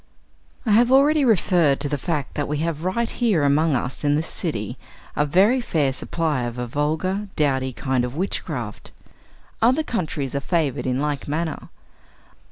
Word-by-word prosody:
I 220 - +1
have 235 +4 +5
already 285 +3 +5
referred 175 - +3
to 145 - -1
the 145 - -1
fact 150 -3 -2
that 145 - -2
we 150 - -2
have 165 -1 -3
right 230 +6 0
here 215 - +1
among 145 +2 +3
us 125 +3 -3
in 145 0 +3
this 155 +2 0
city 110 - -3 0.4
a 150 - +1
very 200 - +4
fair 150 - 0
supply 155 -1 -1
of 120 0 -5
a 125 - -2
vulgar, 160 - -1
dowdy 130 -3 +1
kind 130 0 -1
of 125 +2 -4
witchcraft. 185 +5 -4 0.7
Other 255 +7 +4
countries 155 - -3
are 140 - 0
favored 145 -3 -1
in 130 0 0
like 145 -2 -2
manner. 160 +2 -3
155 Hz, 170 wpm, -23 LUFS, 140-190 Hz, 0.7 s, have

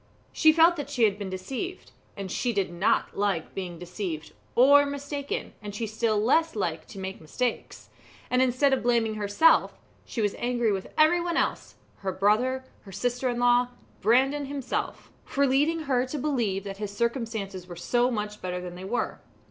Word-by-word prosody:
She 315 - +6
felt 330 +2 +5
that 285 -1 -5
she 255 -5 0
had 205 -2 +3
been 200 -2 -4
deceived, 260 - -5 0.3
and 195 -2 -5
she 245 -2 -1
did 195 -4 -1
not 175 +4 +1
like 195 -5 -1
being 180 -3 -5
deceived, 175 -2 -5 0.2
or 285 +4 +7
mistaken, 285 0 -4
and 205 -1 -7
she 225 - -2
still 220 0 0
less 320 +9 +2
liked 170 -6 -3
to - - -11
make 190 -1 -6
mistakes; 235 +10 -3 0.4
and 250 0 +2
instead 260 +2 +3
of 265 - +1
blaming 235 -2 +2
herself, 215 +10 +3 0.3
she - - -6
was 205 -2 +1
angry 240 -2 +1
with 190 -1 -3
everyone 340 +2 +3
else - - -1 0.2
her 195 -1 -3
brother, 225 +8 +2 0.2
her 195 - -13
sister 245 +5 -1
in 240 - -2
law, 245 0 +4 0.3
Brandon 270 +6 +3
himself 275 -2 -4
for 280 0 +1
leading 295 +5 +2
her 260 -4 +1
to 295 - -4
believe 235 -9 -1
that 195 -1 -6
his 210 0 -4
circumstances 225 -6 -2
were 175 - -8
so 240 +8 +1
much 210 -3 -4
better 180 -1 -3
than 180 -1 -7
they 180 +1 -9
were. 235 +6 -2
235 Hz, 180 wpm, -27 LUFS, 195-270 Hz, 0.4 s, or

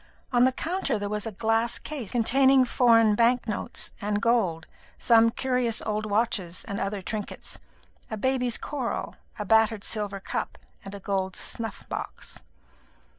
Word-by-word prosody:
On 245 0 +5
the 260 - +4
counter 335 - -2
there 205 0 -3
was 210 +1 -2
a - - -4
glass 225 +3 +1
case 275 -10 -6
containing 265 +2 +4
foreign 230 -3 +4
bank 235 +2 +3
notes 210 - -2
and 205 0 0
gold, 205 -9 +1 0.3
some 230 -1 +5
curious 250 -1 0
old 215 0 -2
watches, 205 -5 -1
and 200 - -3
other 195 0 -3
trinkets, 210 +2 -5 0.5
a 220 - -4
baby's 250 +1 0
coral, 270 -5 -4 0.2
a 210 - -4
battered 220 0 +3
silver 205 -2 0
cup, - - -4 0.3
and 195 +1 -8
a - - -7
gold 190 -1 -2
snuff 225 -2 -4
box. - - -7
225 Hz, 150 wpm, -26 LUFS, 205-245 Hz, 0.5 s, On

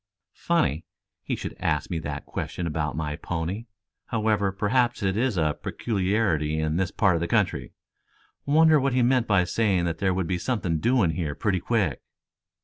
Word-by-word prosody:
"Funny 160 - 0 0.4
he - - -2
should - - -6
ask 75 +4 -1
me 85 - -1
that 75 -2 -5
question 90 - -4
about 75 -2 -2
my 75 -2 -2
pony. 90 +9 -4 0.4
However, 105 -3 +1
perhaps 115 +4 +1
it 95 -1 +1
is 115 -2 0
a 75 -2 0
peculiarity 95 -8 0
in 80 +1 0
this 95 0 0
part 100 -1 +2
of 80 - -1
the 85 - -1
country. - - 0 0.7
Wonder 155 +1 +5
what 135 -1 0
he 125 -1 +3
meant 125 -1 +2
by 100 -4 +4
saying 95 0 +1
that 85 -1 -2
there 95 -2 +1
would 95 -1 0
be 90 +1 -1
something 95 -9 -1
doing 115 -4 +3
here 75 -3 -3
pretty 95 -4 0
quick." 100 - 0
95 Hz, 175 wpm, -25 LUFS, 80-115 Hz, 0.7 s, Wonder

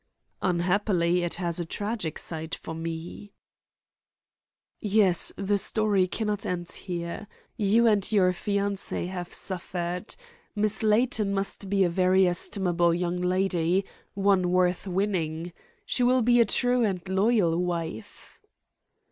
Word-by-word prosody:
"Unhappily, 180 0 +1
it 175 -1 -2
has 175 -1 -2
a - - -1
tragic 205 -1 -3
side 160 0 -4
for 160 - -8
me." 165 +5 -7 1.5
"Yes; 205 -4 +4
the 200 +1 0
story 205 -2 +2
cannot 210 0 -2
end 175 -1 -3
here. 175 +2 -5 0.3
You 220 +1 +3
and 210 -3 +3
your 190 -4 +4
fiancée 200 -1 -2
have 180 -2 -6
suffered. 180 0 -3 0.4
Miss 210 -1 +1
Layton 215 -2 +2
must 195 0 -3
be 195 0 +3
a 180 - +2
very 185 +1 +3
estimable 175 -1 +1
young 175 0 -2
lady 180 0 +1 0.3
one 195 -2 +2
worth 180 +1 +1
winning. 175 -3 -2 0.3
She - - 0
will 250 0 +3
be 240 +1 +4
a - - +5
true 245 +3 +1
and 190 -4 -2
loyal 190 -2 +2
wife." 165 -11 -6
185 Hz, 125 wpm, -26 LUFS, 175-205 Hz, 1.5 s, a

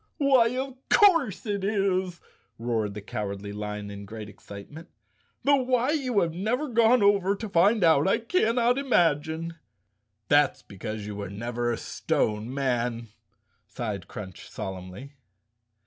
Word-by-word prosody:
"Why, 270 -5 +5
of 265 0 -4
course 330 - +4
it 200 -2 -2
is," 190 -3 0 0.4
roared 110 -3 -2
the 105 - -7
Cowardly 100 -1 -5
Lion 105 0 -5
in 100 0 -8
great 110 0 -8
excitement, 105 +11 -11 0.5
"though 280 -1 +4
why 255 +1 +1
you 255 -9 +1
have 165 -2 0
never 235 - -1
gone 230 0 +4
over 200 -1 +3
to 220 +2 -6
find 200 +3 +3
out 160 -2 +5
I 195 - +3
cannot 240 -2 +2
imagine!" 165 - +1 0.7
"That's 145 0 +3
because 105 +2 -6
you 105 -1 -6
were 100 -2 -5
never 120 +4 -2
a 115 - -2
stone 105 +3 -1
man," 120 -4 -1 0.6
sighed 105 -6 -5
Crunch 95 -4 -9
solemnly. 95 +8 -7
160 Hz, 135 wpm, -27 LUFS, -, 0.7 s, Why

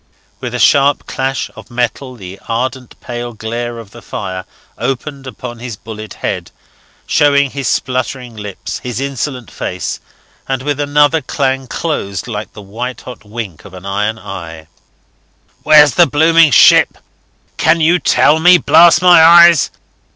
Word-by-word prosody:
With - - -5
a - - -3
sharp 140 0 +3
clash 135 0 -3
of - - -13
metal 125 +2 -3
the 95 -3 -10
ardent 125 +2 -4
pale 120 0 -6
glare 115 +2 -5
of 115 -3 -11
the - - -13
fire 95 -1 -6 0.3
opened 135 +2 -5
upon 125 -2 -8
his 120 -2 -7
bullet 110 -1 -10
head, - - -3 0.6
showing 140 -2 +2
his 135 -3 -4
spluttering 125 -1 -3
lips, 105 -3 -7
his 125 -2 -5
insolent 135 -3 -4
face, 90 - -5 0.5
and 130 -1 -3
with 145 0 -2
another 145 +2 +2
clang 135 -1 -2
closed 120 - -4
like 105 -2 -6
the 105 - -11
white 115 +5 -6
hot 125 -5 -11
wink 105 -5 -8
of 95 - -13
an 90 +1 -11
iron 105 +3 -2
eye. 85 -6 -9 1.0
"Where's 150 -3 +6
the - - +4
blooming 160 +3 +4
ship? 125 - +5 0.6
Can 165 - +2
you 165 +3 +3
tell 155 -1 +3
me? 180 +2 +6
blast 175 +1 +5
my 175 -3 +7
eyes! 170 0 +6
125 Hz, 150 wpm, -14 LUFS, 110-145 Hz, 1.0 s, my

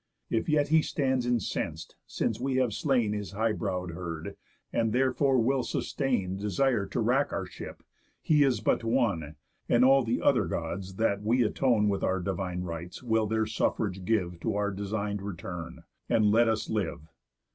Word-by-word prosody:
If 115 +7 0
yet 145 -2 +2
he 160 +1 +5
stands 130 -5 0
incens'd, 90 -9 -2
since 115 - -2
we 130 +1 -1
have 130 -4 +2
slain 120 -7 +1
His 105 -1 -5
high 110 +2 +1
brow'd 90 -5 -3
herd, 85 -2 -6 0.4
and, 115 -1 +1
therefore, 130 +1 +2
will 130 +3 +2
sustain 120 -7 -1
Desire 105 +2 +1
to - - -3
wrack - - +2
our - - -2
ship, - - -9 0.4
he 150 -2 +4
is 135 -3 +1
but - - +1
one, 105 - 0 0.3
And 120 +1 +5
all 135 0 +6
the 115 +1 0
other - - +3
Gods 95 0 -4
that 100 -1 +1
we 120 +4 +2
atone 115 -1 +2
With 100 -1 0
our 95 0 +1
divine 90 -1 -3
rites 85 +4 -6
will 110 -2 +1
their 110 +1 +1
suffrage 100 -3 -1
give 90 -4 0
To 85 - -2
our 105 0 0
design'd 100 +1 -3
return, 90 -3 -7 0.3
and 105 -2 +4
let 115 +1 +4
us 110 -1 -1
live. 100 -7 -2
110 Hz, 170 wpm, -29 LUFS, 95-125 Hz, 0.4 s, all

